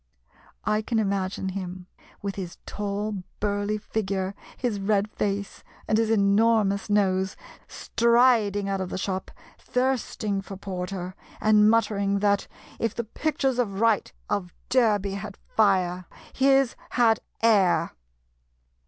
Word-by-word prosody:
I 215 0 +2
can 225 +1 -2
imagine 195 -2 -1
him, 185 -1 -6 0.4
with 200 -1 -2
his 185 -3 -6
tall, 205 0 -3 0.2
burly 205 0 0
figure, 195 -3 -2 0.2
his 235 -5 -1
red 200 +1 +1
face, 200 0 -3 0.2
and 220 - +2
his 225 -1 +1
enormous 210 0 +3
nose, 190 -2 +2 0.3
striding 235 -4 +3
out 195 -1 -1
of 185 - -3
the - - -4
shop, 190 0 -3 0.3
thirsting 250 -6 -1
for 195 0 -9
porter, 185 -1 -5 0.3
and 210 0 +5
muttering 205 -3 +2
that, 200 0 +1 0.3
if 230 -2 -1
the 235 - -2
pictures 265 +2 -1
of 200 -5 -1
Wright 225 -2 +2 0.2
of 180 -3 -2
Derby 210 -6 +3
had 200 0 -6
fire, 185 -4 +1 0.3
his 270 -1 +3 0.2
had 225 -3 +4 0.2
air. 205 -6 +4
205 Hz, 125 wpm, -26 LUFS, 195-225 Hz, 0.4 s, and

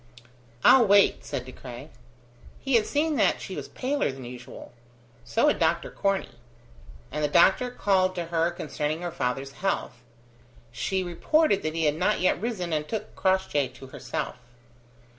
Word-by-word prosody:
"I'll 245 -4 +7
wait," 200 0 +4
said 135 -3 -4
De 130 - -9
Craye. 130 +3 -10 0.7
He 270 - -3
had 225 -3 +4
seen 300 0 0
that - - +3
she - - -7
was - - -6
paler 275 - -1
than 130 -1 -9
usual. 120 0 -10 0.5
So 115 -1 +1
had - - +2
Dr. 170 +1 +1
Corney; 195 -11 -2 0.7
and 150 +2 -3
the - - +3
doctor 190 - +4
called 190 -5 +1
to 175 -2 -3
her 165 0 +2
concerning 155 +1 -3
her 175 - -3
father's 135 -4 -2
health. 135 - -3 0.7
She 190 +10 -1
reported 200 - +2
that 155 0 -3
he 165 -1 0
had 150 0 +1
not - - +1
yet 185 0 +1
risen, 195 -8 -3
and 150 -1 -1
took 220 - -5
Crossjay 190 -7 +1
to 135 - -11
herself. - - -5
170 Hz, 160 wpm, -26 LUFS, 140-200 Hz, 0.7 s, I'll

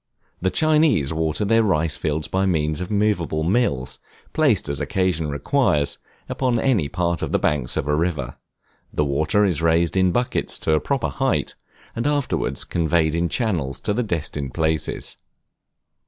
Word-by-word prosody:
The 95 - +2
Chinese 150 - +2
water 80 +5 -1
their 115 +3 +4
rice 80 -7 +1
fields 75 0 -2
by 95 +1 0
means 80 -2 0
of 90 - -4
movable 100 -7 0
mills, 70 - 0 0.3
placed 135 - +2
as 70 -2 0
occasion 95 -6 0
requires, 75 - +1 0.3
upon 125 -3 0
any 115 - +1
part 85 +1 -1
of - - -3
the - - +3
banks 70 -4 0
of - - -1
a 75 - +2
river; 75 -6 -2 0.6
the 75 - 0
water 75 +8 +2
is 85 -5 0
raised 85 +1 +2
in 95 -1 +3
buckets 120 +6 0
to - - 0
a 75 - +4
proper - - -1
height, - - -1 0.4
and 115 +5 -1
afterwards 145 -2 0
conveyed 80 -2 +1
in 85 +1 0
channels 85 - -1
to 105 - 0
the 120 - 0
destined 75 - -3
places. 80 -2 -1
85 Hz, 160 wpm, -22 LUFS, 75-105 Hz, 0.6 s, their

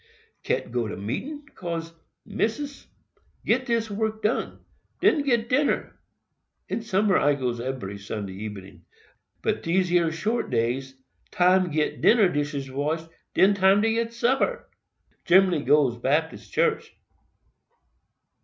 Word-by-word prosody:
"Can't - - -2
go 120 -2 -1
to 105 - -6
meetin, 285 - -5
'cause, 165 -2 -5 0.3
Missis, 225 +7 -3 0.6
get 255 +3 +1
dis 230 -2 0
work 220 +1 -2
done—den 245 +7 -1
get 240 -5 +1
dinner. 280 +4 0 0.7
In - - -3
summer, 205 -3 +2
I 145 +1 +3
goes 125 -3 -2
ebery 120 -6 -5
Sunday 100 -1 -5
ebening; 100 -2 -9 0.6
but - - 0
dese 180 +1 +1
yer 175 -2 +3
short 215 +9 -2
days, 125 +3 -1 0.3
time 185 +1 +3
done 175 - -6
get 150 0 -1
dinner 215 -4 +5
dishes 145 -3 -3
washed, 155 +4 -2 0.3
den 195 +2 +5
time 195 +1 +4
get 225 +1 0
supper. 260 - 0 0.6
Gen'lly 185 -3 +4
goes 140 -5 +3
Baptist 150 +6 -1
church." 460 -2 0
180 Hz, 125 wpm, -25 LUFS, 135-225 Hz, 0.7 s, dinner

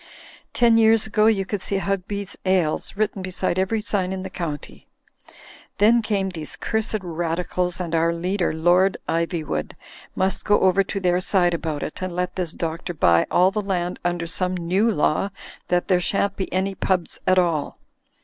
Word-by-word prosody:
Ten 230 -1 +4
years 225 0 +4
ago 215 0 +2
you 200 -4 +2
could 200 0 -3
see 195 - -1
Hugby's 195 +1 -3
Ales 185 -1 0
written 210 -2 -1
beside 185 -1 -1
every 210 +4 0
sign 195 -3 -1
in 190 -1 -4
the 190 - -7
county. 155 -6 -6 0.9
Then 230 +3 +5
came 200 -3 -1
these 160 -5 -5
cursed 220 -2 -2
Radicals, 175 +1 -2
and 170 -2 -4
our 165 0 +3
leader, 180 +2 -1
Lord 175 +4 +3
Ivyvsrood, 165 - -2 0.4
must 190 +1 0
go 205 -1 +3
over 190 +1 +4
to 195 +1 -4
their 180 -1 +2
side 180 -2 +2
about 160 -3 -3
it, - - -6
and 185 -2 -4
let 180 0 -2
this 180 -4 -2
Doctor 165 +2 -4
buy 85 - +4
all 185 +2 +4
the 210 - -1
land 180 -3 -2
under 175 -1 -1
some 180 +2 -2
new 185 +6 +1
law 195 -1 +1 0.4
that 175 0 +1
there 180 -2 +3
shan't 200 +2 0
be 190 - -4
any 190 +1 0
pubs 185 -2 -1
at 185 - +4
all. 165 -5 +1
185 Hz, 175 wpm, -23 LUFS, 170-195 Hz, 0.9 s, Then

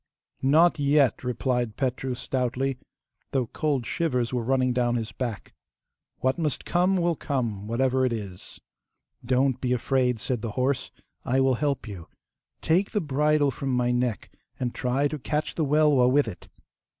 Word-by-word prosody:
'Not 155 +5 +4
yet,' 140 -3 +3
replied 125 -1 -1
Petru 130 -1 -1
stoutly, 130 +1 -2 0.5
though 130 -3 +1
cold 140 0 -1
shivers 125 -8 -1
were 125 - 0
running 130 +1 +1
down 120 -1 +1
his 115 -2 -3
back. 115 0 -5 0.7
'What 130 +4 +1
must 155 -4 -2
come 180 +2 +2
will 170 -1 +1
come, 115 -10 -3
whatever 130 +3 +1
it 130 - +2
is.' 100 -5 -6 0.6
'Don't 130 +1 +1
be 125 -1 +1
afraid,' 125 -1 +1
said 125 0 -2
the 110 -2 -4
horse. 130 +1 0 0.3
'I 130 +2 +1
will 135 0 +3
help 140 -1 -1
you. 95 -6 -8 0.5
Take 180 +5 +2
the 210 - 0
bridle 150 -2 +2
from 135 +1 -4
my 125 -1 +1
neck, 125 -3 -1 0.3
and 125 -2 -2
try 130 +3 0
to 150 +1 -5
catch 150 +3 -2
the 160 - -1
Welwa 145 -4 +4
with 145 -1 +3
it. 90 -5 -8
130 Hz, 160 wpm, -26 LUFS, 120-145 Hz, 0.7 s, Not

